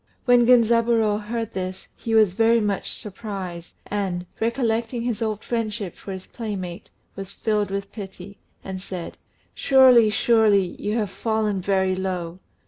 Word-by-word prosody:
When 245 -1 +5
Genzaburô 230 -3 +4
heard 225 +1 -4
this 185 0 -5
he 225 -1 -2
was 215 -5 +5
very 230 +3 +4
much 205 -3 -1
surprised, 190 -4 -6
and, 190 -4 -3
recollecting 230 0 -1
his 235 -2 -2
old 215 -1 -2
friendship 215 -5 -3
for 195 - -9
his 190 -1 -7
playmate, 195 -6 -6 0.3
was 195 -1 -7
filled 210 -1 -1
with 200 0 -4
pity, 195 -1 -9 0.2
and 190 -1 -6
said, 180 -3 -7 0.3
"Surely, 255 -5 +6
surely, 210 -4 +3
you 210 +2 -1
have 210 -4 -1
fallen 215 -3 -1
very 190 0 +1
low. 180 -2 -4
210 Hz, 140 wpm, -23 LUFS, 190-230 Hz, 0.3 s, Surely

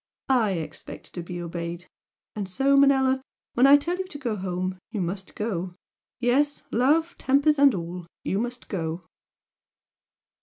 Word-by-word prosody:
I 220 -6 +3
expect 165 -3 -7
to 175 - -4
be 175 +1 -6
obeyed! 170 0 -5 0.5
and 200 -3 -4
so, 275 +8 +3
Manella, 265 -1 +4 0.3
when 250 +3 +5
I 285 +1 +9
tell 345 +5 -2
you 375 - -3
to 315 - -8
go 240 -6 -2
home, 185 -1 -3
you 220 -3 -4
must 190 +2 -4
go! 185 -5 -3 0.4
Yes! 275 +4 +1
love, 305 +8 +2
tempers 280 +2 +3
and 280 -5 +6
all! 175 0 -6 0.2
you 195 - 0
must 245 +2 -4
go!" 165 -2 -3
220 Hz, 150 wpm, -26 LUFS, 180-275 Hz, 0.5 s, I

